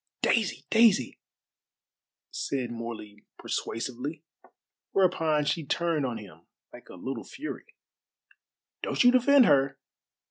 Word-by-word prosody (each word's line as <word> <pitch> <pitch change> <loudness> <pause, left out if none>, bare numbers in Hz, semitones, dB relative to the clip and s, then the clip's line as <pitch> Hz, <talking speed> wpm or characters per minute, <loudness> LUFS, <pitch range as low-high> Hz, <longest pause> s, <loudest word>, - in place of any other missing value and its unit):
"Daisy! 220 -5 +1
Daisy!" 220 - +4 1.1
said 130 -3 -3
Morley 115 -3 -7
persuasively, 130 +7 -4 0.7
whereupon 160 -5 +2
she 150 +3 0
turned 155 -1 0
on 120 -2 -4
him 85 -6 -13 0.3
like - - -14
a - - -10
little 120 +6 -5
fury. 305 +3 -8 1.1
"Don't - - +1
you 245 - +7
defend 255 +1 +6
her. 135 -2 +3
140 Hz, 105 wpm, -28 LUFS, 115-180 Hz, 1.1 s, you